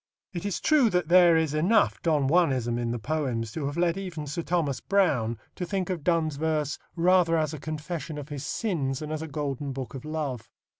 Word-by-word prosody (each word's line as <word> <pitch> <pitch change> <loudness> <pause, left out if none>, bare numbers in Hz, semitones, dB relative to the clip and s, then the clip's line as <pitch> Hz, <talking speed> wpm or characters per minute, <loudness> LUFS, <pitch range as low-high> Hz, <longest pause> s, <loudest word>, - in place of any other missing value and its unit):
It 175 +2 -5
is 200 - -2
true 305 -7 +4
that 180 -4 0
there 175 -2 +7
is 160 -3 +1
enough 185 +8 +2
Don 150 -5 +2
Juanism 130 -8 +2
in 120 -1 -1
the 120 - -1
poems 120 -4 -2
to 145 +1 -3
have 145 +3 -4
led 175 0 +2
even 175 -6 -5
Sir 150 +4 -3
Thomas 160 -6 0
Browne 140 - +1 0.2
to - - -5
think 190 +1 -2
of 170 -5 -4
Donne's 160 -4 +1
verse 155 -2 -1 0.2
rather 175 -1 +4
as 155 -1 0
a 155 - -6
confession 155 +1 -5
of 145 0 -7
his 145 -2 -5
sins 145 - -1
than 155 +2 -6
as 155 0 -3
a 160 - -5
golden 140 -2 -3
book 130 -1 -6
of 135 - -7
love. 150 -6 -4
155 Hz, 210 wpm, -27 LUFS, 140-175 Hz, 0.2 s, there